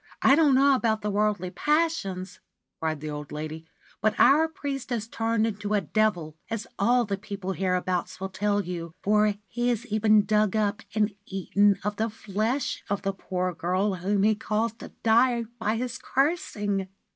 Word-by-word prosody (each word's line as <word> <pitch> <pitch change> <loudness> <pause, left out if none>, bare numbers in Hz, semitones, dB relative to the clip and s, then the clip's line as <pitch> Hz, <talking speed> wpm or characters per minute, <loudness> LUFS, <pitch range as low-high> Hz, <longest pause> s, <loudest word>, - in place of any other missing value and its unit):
' - - -42
1 270 - +7
don't 295 -4 +4
know 275 +1 +5
about 225 -4 +1
the 210 - -1
worldly 205 -3 0
passions,' 295 - -1 0.4
cried 155 -2 -2
the 155 - -4
old 150 -1 -7
lady; 155 +1 -6 0.2
' - - -29
but 215 +1 +1
our 310 +4 +6
priest 280 -5 -5
has 230 -3 -2
turned 225 -1 0
into 210 -1 -2
a 205 - +2
devil, 175 -5 0
as 225 -2 -3
all 240 +4 +3
the 200 -1 -3
people 200 -2 -5
hereabouts 180 -1 -1
will 190 - -3
tell 205 +2 0
you, 170 -2 -6
for 210 0 +3
he 240 +4 -1
has 240 -1 -1
even 215 -1 +3
dug 210 -1 +2
up 210 0 0
and 210 -1 +2
eaten 200 +1 +2
of 210 0 -2
the 225 +1 0
flesh 220 +5 -2
of 200 0 -1
the 195 -1 -1
poor 185 -1 -3
girl 185 +4 0
whom 195 +2 0
he 215 +1 +5
caused 220 +1 -2
to - - -8 0.2
die 235 +1 +4 0.2
by 220 0 0
his 250 +2 -3
cursing 210 - 0
210 Hz, 180 wpm, -26 LUFS, 190-230 Hz, 0.4 s, 1